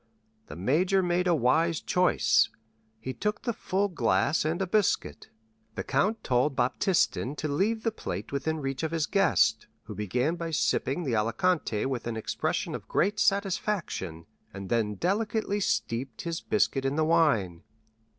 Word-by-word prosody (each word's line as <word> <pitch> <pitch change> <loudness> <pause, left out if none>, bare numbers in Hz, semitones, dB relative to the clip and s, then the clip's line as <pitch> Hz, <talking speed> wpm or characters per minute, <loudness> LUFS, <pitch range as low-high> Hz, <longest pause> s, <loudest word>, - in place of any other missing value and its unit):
The - - -9
major 175 - +2
made 180 +1 +1
a 175 - +4
wise 160 +5 +2
choice; 180 -11 +3 0.5
he 130 +3 -5
took 210 +6 -3
the 235 - -1
full 195 0 -1
glass 130 - +1
and 160 +3 -1
a 190 - 0
biscuit. 205 +1 0 0.5
The - - -3
count 205 +12 0
told 130 +3 +1
Baptistin 130 +2 +1
to 155 - -3
leave 205 +10 0
the 225 - +1
plate 100 - -6
within 155 +3 -2
reach 135 -1 -3
of 160 - -1
his 165 -2 0
guest, 115 - +2 0.2
who 110 - -8
began 125 - -1
by 165 0 -4
sipping 135 +4 0
the 130 -7 -1
Alicante 115 - 0
with 130 -3 -3
an 115 -1 -3
expression 110 - -2
of - - -7
great 205 +3 +1
satisfaction, 190 - -1 0.3
and 95 -1 -8
then 110 -3 0
delicately 205 - -1
steeped 125 - -2
his 170 -1 -3
biscuit 175 -10 +1
in 135 +1 0
the 155 0 +2
wine. 140 - +2
155 Hz, 160 wpm, -28 LUFS, 120-185 Hz, 0.5 s, a